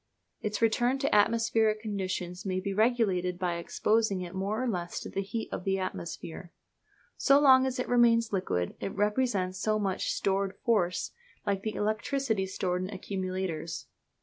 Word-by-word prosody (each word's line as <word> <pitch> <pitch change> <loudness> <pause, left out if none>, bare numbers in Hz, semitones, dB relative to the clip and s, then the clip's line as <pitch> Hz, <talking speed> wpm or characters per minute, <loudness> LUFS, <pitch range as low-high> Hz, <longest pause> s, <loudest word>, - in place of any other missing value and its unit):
Its 210 +1 -2
return 240 +3 +3
to 275 +1 0
atmospheric 225 0 +3
condition 190 -4 -3
may 185 -1 -1
be 195 +1 -3
regulated 200 -5 +2
by 175 -2 -1
exposing 210 +3 +1
it 175 0 -6
more 200 +5 -1
or - - 0
less 175 -6 -2
to - - -8
the 195 - -1
heat 220 +3 -4
of - - -4
the 195 0 +1
atmosphere. 170 -2 -5 0.7
So 280 0 +5
long 265 -2 +6
as 255 - -3
it 250 - -2
remains 230 -2 +4
liquid 135 - -1
it - - -4
represents 205 -3 0
so 215 0 +1
much 195 -3 -1
stored 195 0 0
force, 185 -6 +1 0.3
like 200 -1 0
the 215 +1 -3
electricity 220 0 0
stored 180 -1 -1
in 185 - -3
accumulators. 185 -5 -4
200 Hz, 160 wpm, -29 LUFS, 185-230 Hz, 0.7 s, long